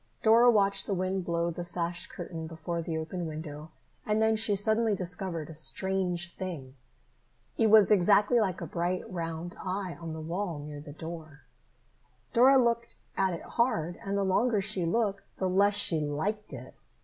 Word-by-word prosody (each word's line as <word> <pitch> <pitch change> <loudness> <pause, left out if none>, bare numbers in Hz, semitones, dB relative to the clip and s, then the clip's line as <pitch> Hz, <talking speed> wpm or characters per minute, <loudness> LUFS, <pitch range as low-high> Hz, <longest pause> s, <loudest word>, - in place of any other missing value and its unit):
Dora 230 +2 +6
watched 200 -3 +2
the 200 - 0
wind 185 +1 -1
blow 170 0 0
the 175 +1 -5
sash 175 0 -1
curtain 165 -2 -7
before 170 +1 -4
the 160 -1 -3
open 165 +2 -4
window 155 -1 -7 0.3
and 210 0 0
then 220 0 +3
she 215 -1 +2
suddenly 220 +2 +1
discovered 175 -3 -3
a 160 - -9
strange 175 +2 -1
thing. 160 -9 -6 0.8
It 225 - +3
was 215 -1 +6
exactly 205 +4 +4
like 190 -5 -1
a - - -3
bright 175 +2 -2
round 165 -1 -5
eye 185 -1 -3
on 165 -1 -5
the 160 - -6
wall 170 +2 -3
near 145 0 -8
the 145 -1 -10
door. 155 -1 -9 0.9
Dora 260 +3 +6
looked 235 -2 +1 0.2
at 190 -2 +1
it - - -9
hard, 175 -9 -1
and 200 0 -2
the 200 - +1
longer 210 +4 +2
she 195 -3 0
looked, 200 +2 0 0.2
the 190 - 0
less 200 +2 +3
she 170 -5 +4
liked 160 +9 -3
it. - - -9
185 Hz, 175 wpm, -29 LUFS, 165-205 Hz, 0.9 s, Dora